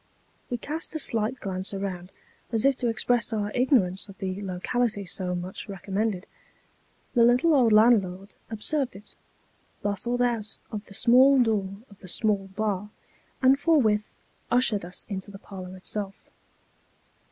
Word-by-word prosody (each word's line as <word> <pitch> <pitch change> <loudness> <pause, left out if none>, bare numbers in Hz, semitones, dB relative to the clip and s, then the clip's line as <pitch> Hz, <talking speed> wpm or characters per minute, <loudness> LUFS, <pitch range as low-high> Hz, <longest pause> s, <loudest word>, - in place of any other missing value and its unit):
We 245 - -1
cast 315 +6 -4
a - - 0
slight 230 -1 +1
glance 190 -1 -3
around, 190 -2 -5 0.4
as 225 +1 +1
if 275 -1 +4
to 245 - -1
express 235 0 +1
our 210 -2 -1
ignorance 210 -7 +2
of 195 - -12
the 190 +1 -4
locality 200 +3 -1
so 180 0 -3
much 180 +4 -6
recommended. 195 +1 -2 0.9
The 235 - +5
little 250 +8 +4
old 250 -6 +4
landlord 205 -3 +3 0.2
observed 250 +4 +1
it; 205 +2 -13 0.7
bustled 235 +5 0
out 230 -3 -1
of 210 -1 -5
the 200 - -9
small 260 +5 +6
door 200 -4 -1
of 200 -2 -18
the 185 - -12
small 200 +1 +1
bar; 210 -1 -1 0.5
and 265 +1 +5
forthwith 225 -11 +2 0.4
ushered 235 -6 +2
us 180 +1 -6
into 195 -1 -5
the 200 - -9
parlour 185 -2 -9
itself. 195 +1 -4
210 Hz, 145 wpm, -26 LUFS, 195-245 Hz, 0.9 s, small